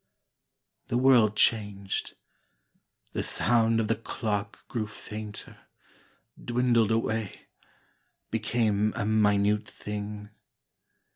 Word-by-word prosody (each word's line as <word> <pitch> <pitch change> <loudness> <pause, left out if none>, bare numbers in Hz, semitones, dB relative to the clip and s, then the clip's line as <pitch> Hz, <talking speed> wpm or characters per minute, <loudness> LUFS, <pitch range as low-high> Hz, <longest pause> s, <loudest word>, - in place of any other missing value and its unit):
The 120 - 0
world 120 -5 +5
changed. 100 -3 0 1.0
The - - -1
sound 115 -1 +2
of 110 - 0
the - - +2
clock 105 -2 -4
grew 110 -3 -3
fainter, 105 0 -8 0.8
Dwindled 120 -2 +2
away, 110 -2 -1 0.9
became 110 -3 +1
a 110 - -1
minute 105 -1 +2
thing. 105 0 -6
110 Hz, 85 wpm, -28 LUFS, 105-115 Hz, 1.0 s, world